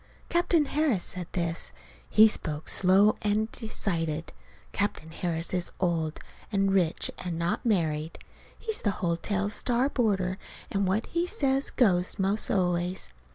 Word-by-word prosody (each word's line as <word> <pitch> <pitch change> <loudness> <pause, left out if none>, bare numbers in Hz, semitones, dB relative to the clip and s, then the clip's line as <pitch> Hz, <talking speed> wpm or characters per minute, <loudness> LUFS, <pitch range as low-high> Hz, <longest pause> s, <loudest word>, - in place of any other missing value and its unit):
Captain 340 -3 +3
Harris 285 - +1
said 180 -2 -6
this. 170 -2 -2 0.4
He 215 +1 +8
spoke 155 -7 -4
slow 195 +3 +4
and 215 +1 0
decided. 165 -8 -2 0.4
Captain 200 -6 -2
Harris 165 0 -2
is 180 -1 -1
old 165 -4 0 0.3
and 195 -1 +2
rich 180 -4 +1
and 175 -2 -4
not 170 +1 -1
married. 160 -8 0 0.4
He's 440 -2 -2
the 205 - +1 0.2
hotel's 195 +4 -1
star 250 +4 +1
boarder, 195 -7 0 0.3
and 195 -1 +1
what 200 +4 +1
he 340 +1 -1
says, 270 -4 0
goes, 185 -8 +2
'most 195 +2 +1
always. 180 - 0
190 Hz, 135 wpm, -28 LUFS, 170-220 Hz, 0.4 s, He